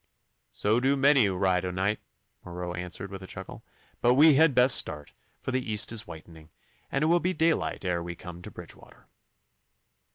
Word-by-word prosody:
'So 110 +3 +1
do 135 +2 +2
many 140 -3 +4
who 95 -2 -1
ride 90 -1 +1
o' 90 - -2
night,' 95 +4 -1 0.4
Marot 90 0 -6
answered, 90 +2 -6
with 95 0 -8
a 95 - -10
chuckle. - - -9 0.4
'But 120 +1 +4
we 155 +3 +7
had 150 -1 +4
best 125 0 +6
start, 75 -2 -4 0.3
for - - -5
the 130 -3 -2
east 105 +1 +1
is 115 -2 -3
whitening, 80 -1 -12 0.4
and 135 - 0
it - - +2
will 170 +2 +4
be 185 +2 -1
daylight 165 - 0
ere 90 -1 -1
we 85 0 -6
come 90 0 -10
to - - -9
Bridgewater. - - -14
100 Hz, 190 wpm, -27 LUFS, 90-135 Hz, 0.4 s, we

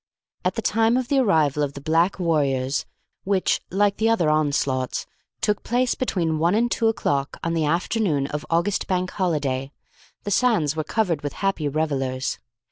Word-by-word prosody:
At - - 0
the - - -3
time 225 +2 +3
of 255 -1 -2
the 280 - +3
arrival 155 - +2
of 140 -1 -1
the 140 - -8
black 165 +6 +1
warriors 140 -6 0 0.4
which, 195 -1 +1
like 200 +1 +1
the 225 +1 +2
other 175 -9 +3
onslaughts, 140 -4 0 0.4
took 210 -2 +1
place 245 +1 +1
between 165 -10 -1
one 170 +5 +2
and 240 +2 +1
two 225 - +1
o'clock 140 -10 -1
on 165 - -1
the 160 -2 +1
afternoon 170 -2 0
of 150 +1 -4
August 170 +4 0
Bank 185 -1 -1
Holiday, 140 -7 -1 0.5
the 205 - -4
sands 195 - +2
were 155 - -1
covered 170 -3 0
with 145 -2 -4
happy 195 -6 -1
revellers. 135 -3 -2
165 Hz, 170 wpm, -23 LUFS, 145-205 Hz, 0.5 s, time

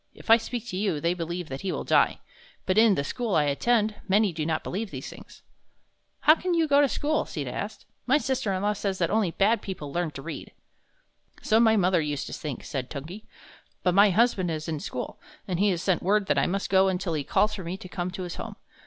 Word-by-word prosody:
If - - -3
I 225 - +10
speak 235 +1 -5
to 185 - -4
you, 190 -6 0
they 170 +3 +1
believe 175 0 -4
that 135 +1 -5
he 190 - -2
will - - -3
die. - - +2 0.4
But 190 +3 +3
in 220 -3 +6
the 140 - -1
school 225 - -2
I 155 - +4
attend, 215 +10 +1
many 200 -1 +3
do 155 -1 -3
not 160 -1 -1
believe 205 +3 -4
these - - -7
things." - - -13 0.8
"How 310 - +7
can 355 +2 -1
you 325 -1 +2
go 285 0 +5
to 285 - +3
school?" 300 +4 0
Sita 140 -5 -5
asked. 210 - -6 0.2
"My 265 +3 +5
sister 260 -6 -1
in 190 0 -2
law 210 0 +2
says 195 -2 -2
that 170 -3 0
only 215 -3 +2
bad 205 +6 +2
people 155 -8 -6
learn 175 -1 0
to 135 - -8
read." 170 - -7 0.9
"So 220 +1 +3
my 220 -1 +5
mother 180 -3 +3
used 145 -2 -3
to - - -7
think," 145 -5 -5
said 130 -4 -4
Tungi; 160 +9 -8 0.6
"but 180 - +2
my 200 +2 +6
husband 195 -3 +2
is 155 0 -4
in 155 -2 -2
school, 125 - -6 0.3
and 180 -3 -2
he 205 +1 +4
has 175 -3 -1
sent 185 -3 +1
word 205 +2 +2
that - - +2
I - - +2
must 195 +2 -2
go 190 0 +5
until 180 -2 -1
he 150 -2 -1
calls 210 +9 +2
for 195 -3 -6
me 175 +3 -4
to 195 -2 -10
come 180 -1 -3
to 185 +1 -6
his 175 -1 -6
home. - - -6
190 Hz, 240 wpm, -26 LUFS, 165-215 Hz, 0.9 s, I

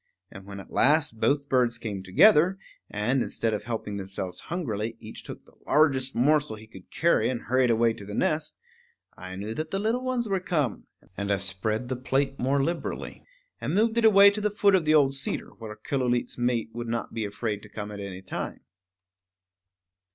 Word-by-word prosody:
And 95 0 -12
when 100 0 -8
at 100 - -12
last 150 -5 +2
both 140 +2 +1
birds 125 -4 +2
came 105 -5 -5
together, 175 - +5 0.3
and, 120 +6 0
instead 115 -2 -1
of 105 - -3
helping 110 -3 -4
themselves 95 -1 -5
hungrily, 115 - -3
each 110 0 -10
took - - -10
the - - -21
largest 135 -4 +3
morsel 145 +1 +2
he 110 +1 -12
could 95 -4 -15
carry 170 +1 +2
and 125 -2 -3
hurried 130 0 +2
away 115 0 +3
to 100 - -11
the 105 +1 -7
nest, 155 0 -1 0.6
I 95 0 -8
knew 105 +3 -5
that 155 +5 -4
the 195 - -2
little 225 +5 0
ones 255 -2 -1
were 195 -2 0
come; 150 - -2 0.3
and 100 +1 -2
I 100 - +3
spread 100 +5 -2
the 130 - -2
plate 135 +2 -1
more 135 +2 +1
liberally, 170 +3 -4 0.4
and - - -2
moved 220 +2 +2
it 235 - +2
away 200 -2 +8
to 210 +1 -4
the 210 - +1
foot 205 -1 +3
of 185 -4 +3
the 155 0 +4
old 140 -3 +4
cedar, 135 - -1
where 110 -2 -9
Killooleet's 125 -2 -1
mate 120 -2 -1
would 120 0 -5
not 115 0 -3
be 115 - -2
afraid 105 0 -3
to 105 - -13
come 105 0 -6
at 105 - -7
any 95 -2 -7
time. - - -5
125 Hz, 195 wpm, -27 LUFS, 105-155 Hz, 0.6 s, away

